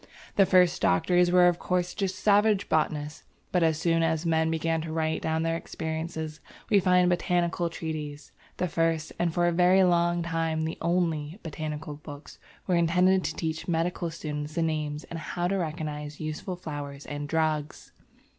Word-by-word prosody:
The 195 Hz, -2 st, +5 dB
first 180 Hz, -2 st, +4 dB
doctors 175 Hz, -, +3 dB
were 180 Hz, 0 st, +6 dB
of 175 Hz, -1 st, +2 dB
course 180 Hz, -1 st, -1 dB
just 190 Hz, -2 st, -2 dB
savage 205 Hz, 0 st, +3 dB
botanists, 150 Hz, -1 st, -1 dB, 0.3 s
but 180 Hz, -, +2 dB
as 160 Hz, -2 st, +3 dB
soon 165 Hz, 0 st, +2 dB
as 160 Hz, 0 st, 0 dB
men 160 Hz, -1 st, +2 dB
began 165 Hz, 0 st, 0 dB
to 160 Hz, 0 st, -5 dB
write 160 Hz, 0 st, -1 dB
down 160 Hz, 0 st, 0 dB
their 165 Hz, 0 st, 0 dB
experiences, 160 Hz, -1 st, -5 dB, 0.3 s
we 205 Hz, -, +6 dB
find 180 Hz, -1 st, +4 dB
botanical 175 Hz, -1 st, +1 dB
treatises. 150 Hz, -3 st, -6 dB, 0.3 s
The 180 Hz, -, 0 dB
first, 165 Hz, -1 st, 0 dB
and 175 Hz, -1 st, +1 dB
for 175 Hz, +1 st, +1 dB
a 175 Hz, -, +3 dB
very 180 Hz, +2 st, +5 dB
long 175 Hz, -1 st, +2 dB
time 165 Hz, -1 st, -1 dB
the 160 Hz, -, -4 dB
only, 165 Hz, -2 st, 0 dB
botanical 155 Hz, -1 st, -5 dB
books 145 Hz, 0 st, -11 dB, 0.3 s
were 185 Hz, -, 0 dB
intended 180 Hz, +2 st, +3 dB
to -, -, -2 dB
teach 160 Hz, -1 st, -3 dB
medical 170 Hz, 0 st, -1 dB
students 150 Hz, -1 st, -5 dB
the 165 Hz, -, +1 dB
names 155 Hz, -1 st, -2 dB
and 165 Hz, -, -7 dB
how 175 Hz, +2 st, -2 dB
to 195 Hz, +2 st, 0 dB
recognize 150 Hz, -3 st, -4 dB
useful 155 Hz, +4 st, -4 dB
flowers 145 Hz, -5 st, -7 dB
and 145 Hz, 0 st, -5 dB
drugs. 155 Hz, -2 st, -1 dB
165 Hz, 170 wpm, -27 LUFS, 155-175 Hz, 0.3 s, were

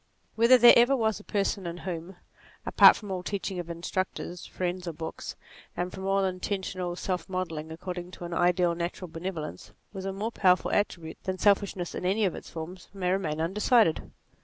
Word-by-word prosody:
Whether 235 Hz, +3 st, +6 dB
there 240 Hz, 0 st, +9 dB
ever 240 Hz, +3 st, +5 dB
was 220 Hz, -4 st, 0 dB
a -, -, -13 dB
person 200 Hz, -3 st, -1 dB
in 170 Hz, 0 st, -5 dB
whom, 175 Hz, 0 st, -5 dB, 0.5 s
apart -, -, +8 dB
from 205 Hz, -3 st, -8 dB
all 185 Hz, -1 st, -2 dB
teaching 190 Hz, 0 st, -3 dB
of 175 Hz, -1 st, -6 dB
instructors, 175 Hz, +1 st, -4 dB
friends 180 Hz, 0 st, -3 dB
or 170 Hz, -, -3 dB
books, 160 Hz, +1 st, -6 dB, 0.4 s
and 180 Hz, +1 st, -2 dB
from 190 Hz, 0 st, -6 dB
all 195 Hz, 0 st, +2 dB
inten 190 Hz, +1 st, -2 dB
tional 180 Hz, -2 st, -4 dB
self 180 Hz, -1 st, -3 dB
modelling 165 Hz, -4 st, -4 dB
according 175 Hz, +2 st, -6 dB
to 175 Hz, -, -8 dB
an 170 Hz, -, -5 dB
ideal, 175 Hz, 0 st, +3 dB
natural 170 Hz, +1 st, -4 dB
benevolence 165 Hz, -2 st, -6 dB, 0.2 s
was 190 Hz, -1 st, -6 dB
a 195 Hz, -, -1 dB
more 205 Hz, +4 st, -3 dB
powerful 185 Hz, -5 st, +3 dB
attribute 170 Hz, -6 st, -2 dB
than 185 Hz, -1 st, -2 dB
self 200 Hz, +1 st, +4 dB
ishness 185 Hz, -3 st, -5 dB
in -, -, -5 dB
any 200 Hz, +4 st, +2 dB
of 185 Hz, -, 0 dB
its -, -, -9 dB
forms, 170 Hz, +2 st, -8 dB
may 180 Hz, -2 st, 0 dB
remain 165 Hz, -5 st, -1 dB
undecided. 200 Hz, +2 st, +2 dB
185 Hz, 190 wpm, -28 LUFS, 175-195 Hz, 0.5 s, there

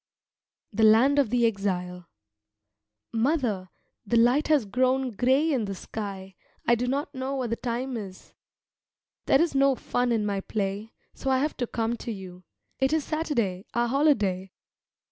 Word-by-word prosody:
THE 220 Hz, -, -1 dB
LAND 230 Hz, +7 st, +6 dB
OF 270 Hz, -6 st, +2 dB
THE 240 Hz, 0 st, +2 dB
EXILE 180 Hz, -4 st, -2 dB, 1.1 s
Mother, 230 Hz, -, 0 dB, 0.3 s
the 235 Hz, +2 st, +1 dB
light 245 Hz, +6 st, +4 dB
has 295 Hz, -7 st, +3 dB
grown 255 Hz, +4 st, +1 dB
grey 265 Hz, +8 st, +2 dB
in 240 Hz, -5 st, 0 dB
the 195 Hz, -1 st, -4 dB
sky; 195 Hz, -1 st, -7 dB, 0.3 s
I 235 Hz, -, +4 dB
do 240 Hz, +1 st, 0 dB
not 280 Hz, +5 st, -2 dB
know 265 Hz, +1 st, -3 dB
what 250 Hz, -4 st, -2 dB
the -, -, +1 dB
time 250 Hz, +2 st, -3 dB
is. 195 Hz, -4 st, -8 dB, 0.9 s
There 270 Hz, -, +5 dB
is 335 Hz, -2 st, +2 dB
no 275 Hz, 0 st, +4 dB
fun 245 Hz, 0 st, -1 dB
in 220 Hz, -3 st, +1 dB
my 200 Hz, -1 st, -1 dB
play, 205 Hz, +2 st, -3 dB, 0.2 s
so 270 Hz, -, -4 dB
I 260 Hz, -, +3 dB
have 295 Hz, +4 st, -1 dB, 0.2 s
come 230 Hz, +1 st, -1 dB
to 235 Hz, -, -5 dB
you. 185 Hz, -3 st, -9 dB, 0.3 s
It 265 Hz, +2 st, +2 dB
is 315 Hz, -2 st, +1 dB
Saturday, 235 Hz, -, -2 dB
our 240 Hz, 0 st, +2 dB
holiday. 210 Hz, -10 st, +1 dB
235 Hz, 160 wpm, -26 LUFS, 200-265 Hz, 1.1 s, LAND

